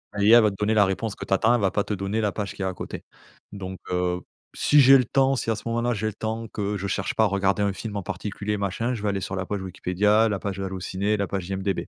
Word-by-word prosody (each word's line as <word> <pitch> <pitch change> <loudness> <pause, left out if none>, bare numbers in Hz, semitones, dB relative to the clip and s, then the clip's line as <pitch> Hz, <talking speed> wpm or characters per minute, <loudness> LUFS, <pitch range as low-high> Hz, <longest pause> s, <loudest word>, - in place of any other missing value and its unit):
l'IA 110 +4 +6
va 105 -2 +3
te - - -9
donner 105 +2 0
la 105 -2 +6
réponse 100 +2 -2
que - - -7
tu - - -1
attends. 110 +5 +4
Elle 120 - 0
va 95 -2 +2
pas 105 - 0
te 105 - -4
donner 100 +3 -2
la 105 -2 +1
page 105 -2 -4
qu'il - - -9
y - - -1
a - - 0
à 95 - -5
côté. - - -7 0.5
Donc, 95 -2 -7
heu, 90 0 0
p - - -26 0.3
si 150 - +4
j'ai 135 +1 +8
le 125 - +2
temps, 135 +2 +2
si 120 - -3
à 110 - +2
ce 105 - -9
moment-là 120 0 0
j'ai 105 - -3
le 110 - -1
temps, 110 +2 -4
que 105 -1 -3
je 100 - -5
cherche 95 0 -2
pas 110 - +3
à - - +4
regarder 100 +1 +1
un 100 -1 +1
film 105 0 -6
en 100 - -4
particulier 105 +1 -4
machin, 100 +5 -1
je 110 - -5
vais 105 - 0
aller 100 - -1
sur 95 0 -4
la 95 -1 -3
page 100 -2 -3
Wikipédia, 105 +4 +2
la 100 - -1
page 100 +1 -5
Allo 95 -1 -4
ciné, 100 +4 -1
la 100 - 0
page 95 -1 -4
IMDb. 95 -2 -2
100 Hz, 305 wpm, -25 LUFS, 95-110 Hz, 0.5 s, j'ai